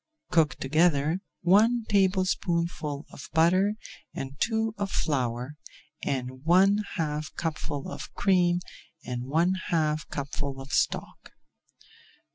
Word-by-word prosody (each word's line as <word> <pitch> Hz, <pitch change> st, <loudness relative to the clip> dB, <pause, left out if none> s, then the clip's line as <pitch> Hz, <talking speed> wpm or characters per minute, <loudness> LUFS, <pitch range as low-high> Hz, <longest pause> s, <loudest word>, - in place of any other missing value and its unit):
Cook 160 Hz, -4 st, +3 dB
together 155 Hz, +3 st, +2 dB, 0.2 s
one 220 Hz, +6 st, +4 dB
tablespoonful 175 Hz, -6 st, 0 dB
of 135 Hz, -, -10 dB
butter 185 Hz, +6 st, +4 dB, 0.4 s
and 135 Hz, 0 st, -5 dB
two 220 Hz, -1 st, +1 dB
of 200 Hz, -1 st, -1 dB
flour, 130 Hz, -3 st, -1 dB, 0.5 s
and 130 Hz, -2 st, -1 dB
add 130 Hz, -, -14 dB
one 190 Hz, +5 st, +5 dB, 0.2 s
half 150 Hz, -2 st, -2 dB
cupful 150 Hz, -3 st, -3 dB
of -, -, -7 dB
cream 180 Hz, -2 st, +3 dB, 0.4 s
and 125 Hz, 0 st, -4 dB
one 165 Hz, +7 st, +2 dB, 0.2 s
half 155 Hz, -2 st, +1 dB
cupful 140 Hz, -1 st, -4 dB
of 135 Hz, +1 st, -9 dB
stock. -, -, -1 dB
160 Hz, 110 wpm, -27 LUFS, 140-185 Hz, 0.5 s, one